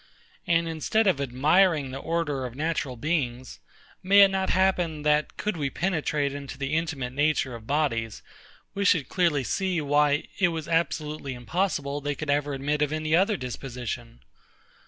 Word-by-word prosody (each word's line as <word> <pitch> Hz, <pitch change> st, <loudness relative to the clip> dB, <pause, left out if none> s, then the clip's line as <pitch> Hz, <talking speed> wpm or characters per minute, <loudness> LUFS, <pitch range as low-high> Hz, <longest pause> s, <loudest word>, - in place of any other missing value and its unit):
And 170 Hz, 0 st, +2 dB
instead 165 Hz, +7 st, 0 dB
of 180 Hz, -8 st, +2 dB
admiring 145 Hz, +3 st, +2 dB
the 135 Hz, -, -5 dB
order 155 Hz, -4 st, -2 dB
of 120 Hz, -, -11 dB
natural 150 Hz, -3 st, -2 dB
beings, 130 Hz, -, -2 dB, 0.4 s
may 200 Hz, +2 st, +6 dB
it 195 Hz, -, +8 dB
not 190 Hz, 0 st, -1 dB
happen, 175 Hz, -5 st, +1 dB
that, 150 Hz, 0 st, +1 dB
could 210 Hz, -1 st, -2 dB
we 140 Hz, -3 st, -1 dB
penetrate 155 Hz, -5 st, -1 dB
into 140 Hz, -1 st, -7 dB
the 135 Hz, +1 st, -3 dB
intimate 150 Hz, -6 st, -2 dB
nature 145 Hz, -2 st, +1 dB
of 115 Hz, -1 st, -10 dB
bodies, 115 Hz, -7 st, -1 dB, 0.5 s
we 200 Hz, -, -2 dB
should 165 Hz, -8 st, +3 dB
clearly 170 Hz, -7 st, +1 dB
see 185 Hz, +5 st, -1 dB
why 145 Hz, 0 st, +2 dB, 0.2 s
it 190 Hz, -, +5 dB
was 165 Hz, -3 st, -4 dB
absolutely 155 Hz, -4 st, -1 dB
impossible 145 Hz, -, -2 dB
they 145 Hz, 0 st, -2 dB
could 145 Hz, +1 st, -3 dB
ever 145 Hz, 0 st, 0 dB
admit 145 Hz, +2 st, -1 dB
of 150 Hz, -1 st, +1 dB
any 155 Hz, 0 st, 0 dB
other 195 Hz, +4 st, +3 dB
disposition? 125 Hz, -, -6 dB
150 Hz, 160 wpm, -26 LUFS, 135-170 Hz, 0.5 s, it